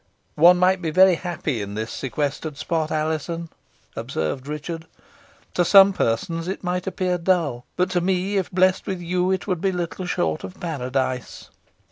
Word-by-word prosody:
"One 175 +2 +8
might 185 +1 +3
be 165 - -1
very 185 +3 +6
happy 165 - -3
in 100 0 -6
this 110 +1 -3
sequestered 145 +2 -3
spot, 160 -1 -1
Alizon," 160 +2 -2 0.5
observed 130 - -3
Richard. 160 +2 -5 0.7
"To 175 - +2
some 195 +2 +7
persons 165 +7 -1
it 190 - -4
might 180 +1 -2
appear 185 -1 -1
dull, 170 -9 0
but 180 +1 0
to 180 -1 +1
me, 190 +2 0
if 190 - -1
blessed 185 +2 +2
with 190 -3 -2
you, 180 +1 0
it 190 -1 0
would 180 -5 -2
be 195 - +1
little 180 0 -4
short 80 - -1
of 95 - -9
Paradise." 130 -5 -3
170 Hz, 165 wpm, -23 LUFS, 150-185 Hz, 0.7 s, One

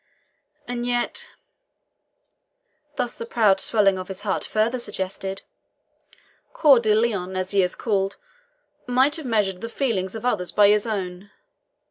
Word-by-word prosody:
And 245 -1 -3
yet" 245 0 -2 1.7
thus 245 -3 -1
the - - -7
proud 210 -5 +3
swelling 195 -4 +3
of 185 - -6
his 190 0 -7
heart 200 -3 -1
further 225 +4 0
suggested 195 -3 -5 1.1
"Coeur 280 -5 +6
de 215 -2 +2
Lion, 200 -5 0
as 185 0 -2
he 200 -1 +3
is 180 -1 -1
called, 195 -3 -1 0.7
might 260 +5 +3
have 310 -5 -7
measured 200 -5 0
the 230 - -5
feelings 225 -7 -2
of 225 +2 -6
others 190 -8 +1
by 205 -1 +5
his 210 +2 +2
own. 190 -2 -4
210 Hz, 140 wpm, -23 LUFS, 190-235 Hz, 1.7 s, Coeur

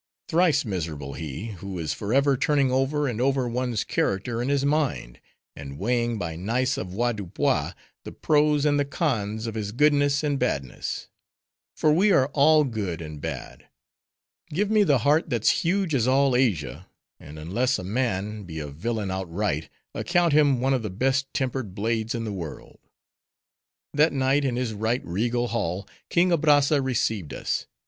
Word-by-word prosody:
thrice 165 -4 +3
miserable 80 -8 -4
he, 80 - -6
who 95 -1 -5
is 80 -3 -2
forever 135 +7 +2
turning 140 0 +2
over 135 +3 +1
and 120 -2 -2
over 135 -1 +1
one's 120 -2 -1
character 115 +5 -1
in 125 - -2
his 140 -1 +1
mind, 140 - -1 0.4
and 70 -1 -8
weighing 120 +3 0
by 85 -5 -4
nice 125 +9 0
avoirdupois, 105 0 -1 0.3
the - - -8
pros 150 -1 +2
and 145 -1 +3
the - - +3
cons 115 - -2
of 115 - -4
his 105 -2 -4
goodness 145 +2 +3
and 145 -2 0
badness. 70 - -3 0.7
For 155 - +3
we 195 +6 +4
are 135 -6 +4
all 155 +2 +5
good 105 - -3
and 75 -3 -8
bad. - - -7 0.8
Give 200 +7 -1
me 215 -1 +5
the 145 -8 +4
heart 155 +3 +3
that's 120 - +2
huge 180 -1 0
as 125 -3 +2
all 135 0 +3
Asia; 90 - 0 0.3
and 75 +1 -11
unless 95 +12 0
a - - -6
man, 105 -1 -2
be 85 -5 -8
a 75 -2 -5
villain 100 +7 -3
outright, 95 -3 -2 0.2
account 175 -3 +1
him 145 -4 +4
one 135 +1 +2
of 130 - +1
the 105 - -4
best 135 +7 0
tempered 130 -8 -3
blades 110 +2 -1
in 115 - -3
the 110 -2 -4
world. 85 -5 -8 1.1
That 150 +2 +3
night, 135 +1 +2
in 125 -3 0
his 125 -2 -2
right 110 +4 -1
regal 120 +7 -1
hall, 95 -4 -2 0.2
King 175 +1 +3
Abrazza 145 -3 +4
received 110 - -1
us. - - -2
120 Hz, 165 wpm, -25 LUFS, 100-140 Hz, 1.1 s, all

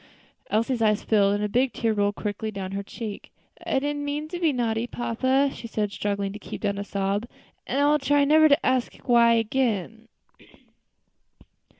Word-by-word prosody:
Elsie's 230 +3 0
eyes 215 -1 +2
filled, 200 -2 +3
and 205 - -2
a - - +1
big 250 +5 +1
tear 225 -2 0
rolled 205 -1 0
quickly 210 +1 -4
down 195 -3 -5
her 200 0 -3
cheek. 210 +1 -8 0.4
"I - - +1
did 290 +2 -1
not 290 - -4
mean 290 +1 -3
to 350 +1 -5
be 330 -3 +2
naughty, 235 -2 -1
papa," 260 +4 0
she 235 - -8
said, 210 -2 -2
struggling 200 0 -2
to 210 - -8
keep - - -8
down 200 -1 -1
a - - -3
sob, 200 +2 -2 0.4
"and 270 - -1
I 285 - +4
will 300 +1 +4
try 285 +1 +3
never 310 +2 +6
to 285 +3 +3
ask 255 -1 +1
why 235 -2 +5
again." 225 -2 -1
230 Hz, 190 wpm, -25 LUFS, 205-270 Hz, 0.4 s, never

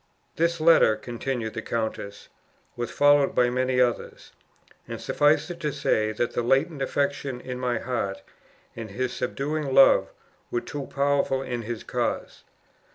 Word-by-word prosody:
"This 170 +1 +1
letter," 155 -9 +5
continued 120 -1 -4
the - - -4
countess, 110 -3 -4 0.5
"was 120 -1 -3
followed 145 -1 +4
by 125 -1 +3
many 130 0 0
others; 125 -2 -1 0.6
and - - -6
suffice 150 +3 +2
it 175 - -8
to 150 - -2
say, 110 -6 0
that 120 +3 -2
the - - 0
latent 135 +5 +1
affection 140 -1 -1
in 125 0 -6
my 125 -2 0
heart, 100 -6 -3 0.5
and 115 -2 -7
his 125 +5 -3
subduing 145 -1 -2
love, 135 - +6 0.4
were 120 - -1
too 145 -2 -6
powerful 140 -1 0
in 120 -2 -4
his 115 0 -5
cause. - - -3
130 Hz, 150 wpm, -25 LUFS, 120-145 Hz, 0.6 s, love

